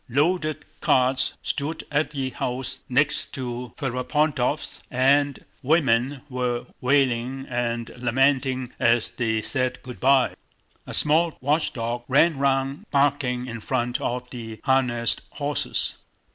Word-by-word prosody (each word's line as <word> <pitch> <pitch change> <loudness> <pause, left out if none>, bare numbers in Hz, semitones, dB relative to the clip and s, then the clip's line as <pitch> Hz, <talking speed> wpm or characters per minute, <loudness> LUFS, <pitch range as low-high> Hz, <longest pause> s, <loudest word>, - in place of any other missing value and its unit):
Loaded 155 +3 +1
carts 130 +1 +2
stood 155 +3 -2
at 150 +1 +1
the 135 -3 -3
house 125 +1 -3
next 140 +4 +1
to 125 -2 -5
Ferapóntov's 140 +1 -1
and 140 +2 +2 0.2
women 135 -3 +2
were 125 -2 -2 0.2
wailing 130 -1 +1
and 120 -2 -2
lamenting 130 +1 +1
as 115 -1 +3
they 110 -3 -1
said 130 0 -1
good 125 -2 -9
by. 135 0 +4 0.5
A - - -2
small 160 +2 +3
watchdog 125 -5 -1
ran 145 +2 +4
round 135 +6 0
barking 135 -3 +1
in 120 -2 -6
front 120 +1 -1
of 125 +1 -2
the 110 -3 -7
harnessed 125 -4 +1
horses. 145 0 -1
130 Hz, 115 wpm, -24 LUFS, 120-145 Hz, 0.5 s, by